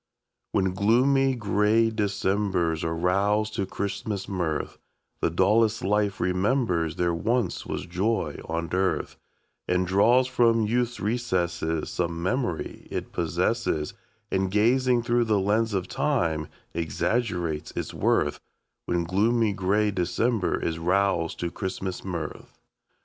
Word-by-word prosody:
When 95 -1 +1
gloomy, 130 +7 +3
gray 105 +1 +2
Decembers 100 -5 0
are 80 0 -1
roused 100 +5 +1
to 100 - -2
Christmas 100 0 -3
mirth, 85 -6 -2 0.4
The - - +1
dullest 105 +6 +2
life 100 0 +1
remembers 90 - +1
there 85 -1 +1
once 110 +4 -1
was - - -4
joy 90 -3 -1
on 85 +1 -2
earth, 95 +1 0 0.5
And 90 0 +1
draws 115 +8 +4
from 115 -3 +3
youth's 120 +2 0
recesses 90 -8 -1
Some 85 -1 -2
memory 110 - -2
it - - -4
possesses, 75 -1 -1 0.4
And, 95 0 +1
gazing 120 +4 +3
through 120 0 +2
the 105 -2 +2
lens 110 +4 +1
of 95 -1 -1
time, 85 - 0 0.3
exaggerates 85 0 -1
its - - -4
worth, - - +1 0.5
When 85 -1 +1
gloomy, 105 +5 +2
gray 100 +3 +1
December 100 +3 0
is 80 0 -2
roused 90 -1 +1
to 85 -1 -2
Christmas 95 -1 -4
mirth. 85 -5 -6
100 Hz, 120 wpm, -26 LUFS, 85-115 Hz, 0.5 s, draws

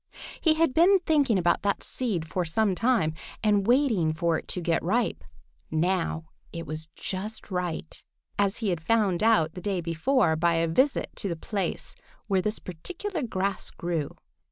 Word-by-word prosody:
He 315 -2 +4
had 325 -4 +2
been 355 +7 +6
thinking 285 - +3
about 175 -1 +2
that 200 -1 0
seed 200 -11 -2
for 180 +3 -1
some 195 +5 +1
time 225 -7 +2 0.3
and 205 -2 +3
waiting 235 - +3
for 165 0 +1
it - - -14
to - - -2
get 170 -1 +1
ripe. 230 +8 0 0.5
Now 165 0 0 0.3
it 165 0 -6
was 155 0 -6
just 210 +3 -5
right, 175 -3 -3 0.4
as 200 -1 +2
he 220 -4 -1
had 175 -3 -1
found 200 -1 +2
out 215 -8 +3
the 180 - -7
day 195 -1 -1
before 170 - +2
by 170 +1 +2
a 165 0 +2
visit 260 - +1
to 200 - -1
the 170 - -2
place 195 +4 -3 0.3
where 195 -3 +1
this 210 +3 -1
particular 340 - -5
grass 195 -5 -2
grew. 165 -4 -3
190 Hz, 170 wpm, -27 LUFS, 165-230 Hz, 0.5 s, been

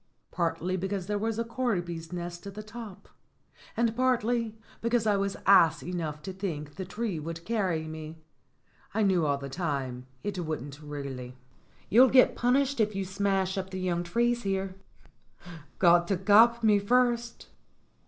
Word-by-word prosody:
"Partly 170 +2 -1
because 190 0 -3
there 205 +1 -1
was 220 +1 -1
a 230 - 0
corby's 180 -9 -3
nest 175 +1 -6
at 200 - -8
the 215 - -6
top, 215 -2 -10 0.7
and 230 -1 +1
partly 235 -3 +1 0.2
because 235 0 +1
I 210 -2 +3
was 200 0 -1
ass 170 -5 +5
enough 160 -4 -4
to 190 - -5
think 155 -7 -5
the 190 - -6
tree 205 -2 -3
would 165 +2 -6
carry 185 -8 -1
me. 155 0 -7 0.8
I 220 - +2
knew 180 -6 +3
all 140 -1 +1
the 140 0 -7
time 135 -5 -3 0.2
it 200 -3 -3
wouldn't 150 -3 -5
really." 135 -4 -7 0.5
"You'll 250 +4 +6
get 255 0 +5
punished 265 +2 +1
if 215 -2 +1
you 195 -1 -2
smash 195 0 0
up 190 0 -5
the 190 -1 -5
young 180 -2 0
trees 235 +7 0
here." 195 -2 -2 1.0
"Got 175 -1 +5
to 195 - +1
cop 225 +5 +5
me 210 -2 +5
first." 240 +2 +1
190 Hz, 160 wpm, -28 LUFS, 165-225 Hz, 1.0 s, You'll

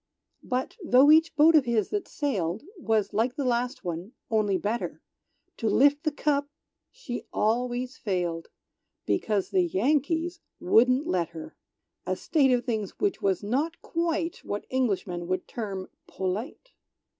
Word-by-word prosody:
But 255 - -3
tho' 275 -1 +6
each 320 +1 +5
boat 310 +2 +6
of 300 -5 +5
his 230 -4 +1
that 410 -3 -2
sailed 205 - -2 0.2
Was 220 -7 0
like 230 +5 +1
the 285 -3 -2
last 250 +2 -1
one, 175 +6 -5 0.2
only 210 -3 +2
better, 210 +6 -3 0.6
To 225 - 0
lift 285 +6 +4
the 310 - 0
cup 285 -1 0 0.4
she 290 - -7
always 245 +3 0
failed, 175 -5 -2 0.6
Because 200 - 0
the 190 -2 +3
Yankees 295 - 0 0.2
wouldn't 255 +5 +4
let 175 -3 0
her. 160 - -9 0.5
(A - - 0
state 280 -5 +2
of 245 0 +1
things 220 -6 -3
which 405 -1 0
was 195 0 +1
not 285 +10 -1
quite, 330 0 -1
What 205 - -4
Englishmen 195 -9 -1
would 185 0 -2
term, 195 -5 -5 0.2
polite!) 205 - -4
240 Hz, 145 wpm, -27 LUFS, 200-290 Hz, 0.6 s, tho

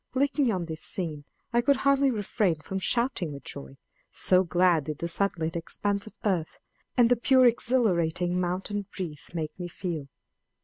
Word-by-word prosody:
Looking 280 -1 +2
on 180 -4 -2
this 160 -1 -6
scene 155 -6 -4 0.3
I 240 - +4
could 280 +4 +4
hardly 275 0 +4
refrain 205 -5 0
from 190 +5 -5
shouting 230 - 0
with 140 -2 -8
joy, 70 0 -8 0.3
so 185 0 +4
glad 175 -3 +3
did 150 0 -4
the 170 - -3
sunlit 165 -2 -1
expanse 200 +5 -2
of - - -12
earth, 180 -6 0 0.4
and 240 -2 +6
the 245 - +4
pure 255 +2 +4
exhilarating 180 -8 +2
mountain 190 +3 -2
breeze, 165 -6 -7
make 155 -2 -2
me 175 - -4
feel. 170 -5 -5
185 Hz, 165 wpm, -27 LUFS, 165-230 Hz, 0.4 s, and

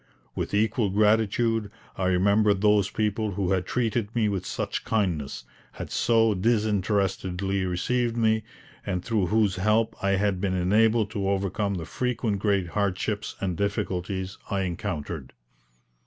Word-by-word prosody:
With - - -3
equal 110 0 +1
gratitude 110 +2 +2 0.3
I 95 - -2
remembered 100 +2 +3
those 105 -2 +4
people 105 -1 -1
who 95 -1 -1
had 95 -2 0
treated 115 -2 -1
me 110 -3 +2
with 95 -2 -3
such - - -3
kindness, 90 -11 -1 0.3
had - - -7
so 115 -2 +3
disinterestedly 100 -2 0
received 120 +6 0
me, 110 -1 +2 0.4
and 90 -2 -3
through 110 -6 +1
whose 105 -1 +2
help 110 +4 +2
I 100 0 +2
had 95 -1 0
been 95 -2 0
enabled 110 +4 +3
to 100 -3 -1
overcome 100 +1 -1
the 85 -3 -4
frequent 115 +2 -1
great 100 -3 +1
hardships 100 +2 -2
and 95 -3 -2
difficulties 95 -1 -2
I 100 -1 0
encountered. 85 - -4
100 Hz, 140 wpm, -26 LUFS, 95-110 Hz, 0.4 s, those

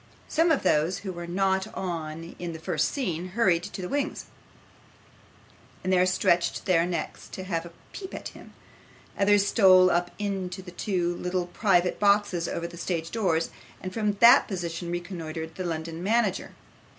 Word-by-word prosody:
Some 330 +2 +2
of 320 - +2
those 155 +5 +2
who 190 - -3
were 170 0 -7
not 190 +3 0
on 165 -2 -5
in 175 -1 -4
the 160 - -8
first - - 0
scene, 180 - -2
hurried 180 -7 +3
to 185 +1 -7
the - - -3
wings, 285 +4 -2 1.6
and 185 0 +1
there 180 0 +4
stretched 175 -1 +1
their 175 -2 +3
necks 170 -3 -4
to 190 - -7
have 170 -3 -3
a - - -13 0.2
peep 380 -1 -7
at - - -6
him; - - -15 0.6
others 200 0 +4
stole 185 -3 +6
up 175 0 +1
into 190 -2 -3
the 180 - -10
two 175 -2 -1
little 180 0 -1
private 180 -1 +1
boxes 200 -4 +2
over 170 - -3
the 170 0 -8
stage 165 -2 -3
doors, 175 -8 0 0.3
and 185 0 -6
from 210 -2 0
that 235 +4 +7
position 175 -3 -4
reconnoitred 165 -2 -5
the 185 - -5
London 165 -1 -4
manager. 210 -1 0
180 Hz, 165 wpm, -27 LUFS, 170-195 Hz, 1.6 s, that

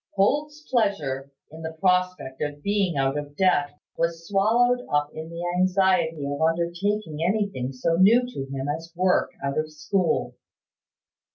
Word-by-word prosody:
Holt's 295 +9 0
pleasure 145 - 0 0.2
in 160 +1 -10
the 160 0 -5
prospect 180 -5 0
of 145 0 -4
being 200 -6 +1
out 135 +1 +1
of 145 0 -9
debt 145 -6 +2 0.2
was 165 0 -2
swallowed 235 +5 +3
up 145 0 +1
in 160 +1 -7
the 170 +1 -5
anxiety 185 -5 +2
of 145 +2 -3
undertaking 170 +1 0
anything 190 -9 0
so 165 +6 0
new 225 +7 +6
to 135 - -6
him 135 0 -3
as 160 +3 -4
work 185 +1 +2
out 140 +2 -1
of 155 0 -3
school. 170 +3 0
170 Hz, 150 wpm, -25 LUFS, 145-195 Hz, 0.2 s, new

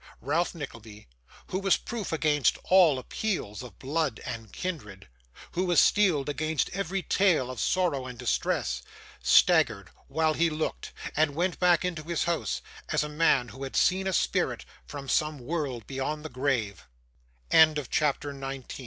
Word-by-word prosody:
Ralph 160 +8 0
Nickleby, 115 -8 -9 0.4
who 185 - -1
was 195 -2 +3
proof 225 -4 -5
against 150 -3 +2
all 175 -6 +5
appeals 130 - -3
of 125 -7 -11
blood 145 -3 -1
and 115 -4 -6
kindred 105 - -6 0.4
who 180 +2 -1
was 175 -4 +4
steeled 180 -10 +3
against 155 +1 -1
every 195 0 -2
tale 170 -10 +2
of 125 - -7
sorrow 165 -9 0
and 125 -1 -8
distress - - -1 0.4
staggered - - +4 0.2
while 160 +2 +1
he 165 +2 +2
looked, 155 - -4 0.2
and 150 -2 +2
went 175 +2 -1
back 180 -1 +4
into 170 -3 -2
his 165 +2 -1
house, 165 -12 -1 0.3
as - - +1
a 150 - -4
man 150 -5 +2
who 130 +5 -12
had 135 -1 -5
seen 190 +1 +2
a 190 - 0
spirit 65 - 0 0.2
from 140 -2 -7
some 155 +2 +1
world 135 -4 -3
beyon 150 +3 -4
155 Hz, 140 wpm, -28 LUFS, 130-175 Hz, 0.4 s, all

